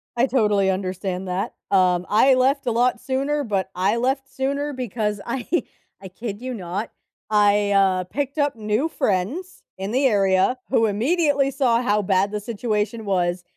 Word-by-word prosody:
I 245 +3 +2
totally 210 -7 +2
understand 185 0 -3
that. 185 +2 -2 0.2
Um, 180 -2 +3
I 260 +5 +5
left 265 +1 +1
a - - +2
lot 245 +2 +1
sooner, 275 +3 -1
but 195 -5 -2
I 195 +5 +1
left 265 +3 -1
sooner 280 +2 -2
because 220 -5 -2
I 240 +1 -4 0.5
I 195 - -8
kid 205 +2 -7
you 255 0 -4
not, 195 +1 -5 0.4
I, 205 -1 +3
uh, 190 -2 +3
picked 280 - -4
up 290 -2 +1
new 215 +8 0
friends 250 - -2
in 195 +2 -4
the 265 +4 +1
area 195 0 +3
who 225 -4 +3
immediately 280 - +1
saw 250 -4 +1
how 210 -3 +1
bad 195 0 +1
the 210 - -2
situation 215 0 -2
was, 180 -2 0
215 Hz, 165 wpm, -22 LUFS, 195-260 Hz, 0.5 s, I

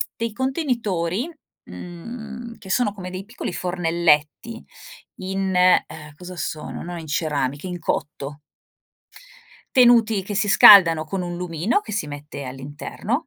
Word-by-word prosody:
dei 230 0 -3
contenitori, 240 - -1 0.4
mhmm, 220 - -9
che 195 - -12
sono 210 +1 +1
come 185 -3 -7
dei 185 +1 -6
piccoli 225 -3 -6
fornelletti 170 +4 0 0.5
in 190 0 -3
ehm, 160 -4 +2
cosa 180 +3 -10
sono, 155 -1 -5
no 175 +1 -6
in 160 - -10
ceramica, 145 -1 -2
in 180 -1 -5
cotto 145 -2 -4 1.3
tenuti 230 -5 +5
che 205 +2 -6
si 210 - +1
scaldano 170 -6 +8
con 185 +5 -4
un 175 -1 -5
lumino 175 - -1
che - - -11
si 200 -7 -2
mette 145 -1 -8
all'interno 145 - -5
180 Hz, 130 wpm, -22 LUFS, 155-220 Hz, 1.3 s, scaldano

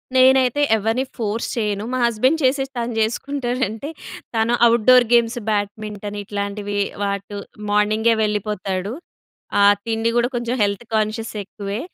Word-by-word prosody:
నేనైతే 260 +1 +5 0.2
ఎవరిని 225 +4 0
ఫోర్స్ 225 0 -2
చేయను. 210 -2 -1
మా - - 0
హస్బెండ్ 255 +7 +2
చేసిస్తా 270 -1 0
అని 235 -1 -5
చేసుకుంటాడంటే, 250 +1 -2 0.5
తను 225 +1 +2 0.2
ఔట్‌డోర్ 240 +2 +5
గేమ్స్, 235 0 +3
బ్యాడ్మింటన్ 210 0 -3
ఇట్లాంటివి 200 0 -4 0.3
వాటు 200 0 -3 0.3
మార్నింగే 215 +2 +3
వెళ్ళిపోతాడు. 205 -2 -2 0.7
ఆ - - +6 0.2
తిండి 225 0 0
కూడా 240 0 +3
కొంచెం 240 +1 -1
హెల్త్ 200 +3 -1
కాన్షియస్ 220 +1 -1
ఎక్కువే. 200 +1 -6
220 Hz, 120 wpm, -21 LUFS, 205-240 Hz, 0.7 s, ఆ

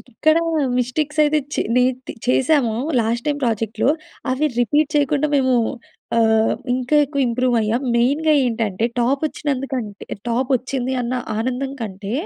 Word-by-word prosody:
ఎక్కడ 310 +6 +1 0.4
మిస్టేక్స్ 300 +5 -2
అయితే, 305 +1 +2 0.2
చె - - +1
నె 250 - +5 0.4
చేశామో, 255 -2 +2 0.3
లాస్ట్ 235 +1 -1
టైమ్ 290 -1 0
ప్రాజెక్ట్‌లో, 225 0 0 0.4
అవి 275 +4 +1
రిపీట్ 295 +6 +2
చేయకుండా, 290 +1 +2
మేమూ 260 -2 +3 0.6
ఆహ్, 220 -1 +3 0.2
ఇంకా 255 +4 +1
ఎక్కువ 280 0 -3
ఇంప్రూవ్ 250 +1 +1
అయ్యాం. 220 +4 0
మెయిన్‌గా 290 +6 +2
ఏంటంటే, 225 -4 -1 0.2
టాప్ 270 +4 +1
వచ్చినందుకంటె 265 -8 -4 0.2
టాప్ 250 +3 -1
వచ్చింది, 255 +1 -3
అన్న 245 +1 -2 0.2
ఆనందం 255 +3 -2
కంటే, 200 -1 -5
255 Hz, 130 wpm, -20 LUFS, 230-280 Hz, 0.6 s, నె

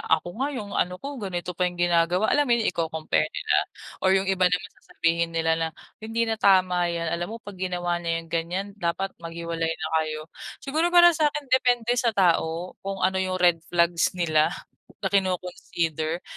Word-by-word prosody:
"Ako 160 +2 +2
nga 280 - +1
yung 205 -3 -6
ano 180 0 0
ko, 280 -1 -6
ganito 180 -2 -4
pa 180 - +3
yung 175 - -10
ginagawa," 175 +3 +2
alam 290 -1 +3
mo 240 - +5
yun? 225 - -1
Iko-compare 160 - -1
nila - - 0 0.4
or 190 - +3
yung 190 - +1
iba 185 -1 +3
naman 180 0 -2
sasabihin 165 0 0
nila 165 0 +1
na, 165 0 0 0.3
"Hindi 225 +1 -2
na 225 -1 -2
tama 185 -2 +4
yan, 170 -1 -2
alam 175 +2 -2
mo 225 - -6
'pag 200 -2 -10
ginawa 175 -1 -1
niya 165 -1 -2
yang - - -18
ganyan, 170 +4 -1
dapat 180 +2 -2
maghiwalay 165 0 -3
na - - -4
kayo." 155 -1 -3 0.4
Siguro 310 +5 +1
para 345 0 +7
sa'kin, 295 -2 0
depende 245 -2 +3
sa 235 -2 +1
tao 170 -2 +1
kung 195 -1 -5
ano 190 0 +2
yung 185 0 -1
red 175 -2 +4
flags 170 0 +2
nila, 155 -3 +3 0.5
na - - 0
kino-consider. 175 -4 -1
180 Hz, 185 wpm, -25 LUFS, 170-200 Hz, 0.5 s, para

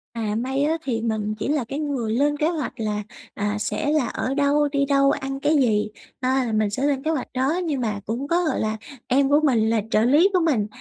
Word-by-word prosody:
À 215 -2 -2
may 265 +4 -1
á, 315 +2 +1
thì 235 -6 -2
mình 215 -2 -1
chỉ - - -2
là 290 -2 +1
cái 275 +6 -5
người 265 -7 -2
lên 290 +4 +1
kế 305 +2 +1
hoạch 320 -5 -3
là, 210 -1 -2 0.3
à, 205 +1 -2
sẽ 290 +6 -1
là 305 -5 +2
ở 260 - -2
đâu, 290 +1 +2
đi 280 -1 +1
đâu, 275 0 +3
ăn 270 -1 -3
cái 300 +3 +2
gì, 215 -7 +2 0.3
à, 260 +1 +1
là 225 - -3
mình 215 -1 +1
sẽ 255 +6 -3
lên 280 -2 +1
kế 315 - 0
hoạch 300 -5 -2
đó. 265 +3 +1
Nhưng 290 -6 -1
mà 215 -3 -2
cũng 240 +6 -3
có 345 +3 +2
gọi - - 0
là 215 0 -1 0.3
em 270 +2 +3
của 290 - +5
mình 230 -7 +3
là 225 -1 +2
trợ 215 - +3
lý 295 - +5
của 365 - +4
mình. 270 -12 +1
270 Hz, 250 wpm, -23 LUFS, 220-290 Hz, 0.3 s, của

